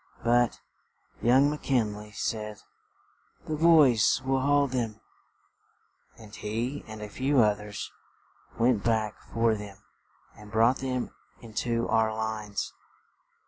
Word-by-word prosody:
But, 120 0 +2 0.6
young 130 +5 +5
Mc 150 - -5
Kin 115 -6 +1
ley 105 0 -10
said, 105 0 -4 0.8
"The 155 - -2
boys 150 -9 +5
will 135 0 +2
haul 145 +1 +3
them;" 120 -5 -3 1.2
and 110 -2 -12
he 115 +7 -3
and 110 -1 -8
a - - -5
few 130 +6 +1
oth 105 -1 +2
ers 105 0 -7 0.7
went 115 -3 +2
back 110 -2 0
for 115 0 +2
them 105 -2 -7 0.6
and 105 0 -13
brought 115 +4 +4
them 130 -2 -3 0.3
into 115 +1 -2
our 110 -1 +2
lines. 110 -2 -3
115 Hz, 125 wpm, -28 LUFS, 105-130 Hz, 1.2 s, young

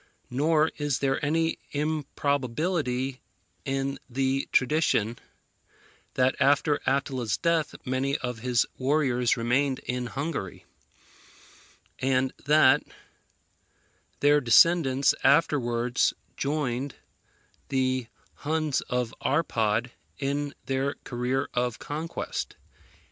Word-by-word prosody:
Nor 155 +4 +2
is 145 -3 0
there 135 0 0
any 160 +2 +1
improbability 145 -2 -1 0.4
in 135 0 -2
the 135 +2 0
tradition, 125 -5 +2 1.0
that 130 0 +3
after 145 +1 +3
Attila's 130 -5 0
death 165 -2 0
many 135 +2 0
of 125 -2 -4
his 125 0 +2
warriors 130 -3 +2
remained 130 +4 +1
in 125 0 -2
Hungary, 135 - -4 1.3
and 130 0 +1
that 145 -1 +5 1.4
their 145 +1 +5
descendants 135 +2 +5
afterwards 125 -5 +2 0.2
joined 140 -2 -2 0.7
the 130 -2 0 0.3
Huns 155 -1 0
of 125 -2 -1
Arpad 120 -6 0 0.3
in 140 +1 -2
their 135 +1 -1
career 125 +2 -1
of 125 -2 -1
conquest. 155 +3 -5
135 Hz, 90 wpm, -27 LUFS, 125-145 Hz, 1.4 s, that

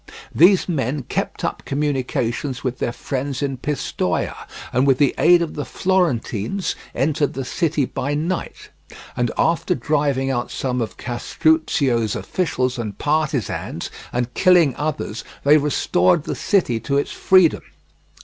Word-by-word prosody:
These 180 +4 +5
men 140 -4 -1
kept - - -3
up - - -2
communications 135 -2 -2
with 130 -1 -3
their 120 - -1
friends 135 +2 -3
in 135 -2 -2
Pistoia, 145 +3 -2 0.4
and 130 +3 +2
with 135 -2 +4
the 145 -1 +3
aid 175 +1 +6
of 165 - -5
the 145 - -3
Florentines 175 - -1 0.2
entered 145 +3 +1
the 135 -1 -3
city 155 -1 0
by 140 +3 -3
night, 170 +5 -4 0.4
and 120 -1 0
after 165 0 +1
driving 140 0 0
out 120 -2 -2
some 125 -2 -2
of 110 - -4
Castruccio's 125 -2 +1
officials 130 -8 -1
and 105 -4 -5
partisans, 150 -7 -1 0.2
and 125 0 -2
killing 175 -8 +4
others, 145 -7 -3 0.2
they 145 +2 +6
restored 140 - +2
the - - -3
city 170 - +1
to 140 +5 -1
its 140 - -1
freedom. 185 -4 +4
140 Hz, 140 wpm, -21 LUFS, 125-155 Hz, 0.4 s, aid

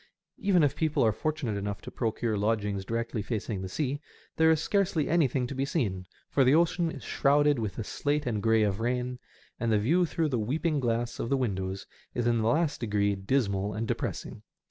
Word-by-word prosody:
Even 195 -7 +3
if 140 -1 +2
people 155 -4 +1
are 110 - +4
fortunate 150 -3 -2
enough 100 0 -3
to - - -8
procure 115 -1 -1
lodgings 105 -1 0
directly 115 0 -2
facing 105 -2 -3
the 95 - -5
sea, 145 +6 -2 0.3
there 160 0 +4
is 160 -1 +4
scarcely 190 -4 +1
anything 140 -6 +2
to 125 - -5
be 135 0 -1
seen, 105 - -1 0.2
for 140 - +3
the 130 +3 +5
ocean 170 +1 +2
is - - -8
shrouded 145 -1 +3
with 110 -3 -3
the 115 - -3
slate 145 +7 -1
and 110 -4 -1
grey 115 0 +3
of 100 -1 0
rain, 125 +1 -1 0.4
and 115 -1 0
the 110 - +4
view 165 - +2
through 160 -1 0
the 125 -4 0
weeping 150 +7 0
glass 120 -1 -1
of 115 - -2
the 140 - +2
windows 95 -6 -2 0.3
is 120 - 0
in 120 -1 +2
the 110 - +1
last 155 +4 +1
degree 100 -3 +1
dismal 100 -1 0
and 110 +1 -3
depressing. - - -4
120 Hz, 205 wpm, -29 LUFS, 105-150 Hz, 0.4 s, the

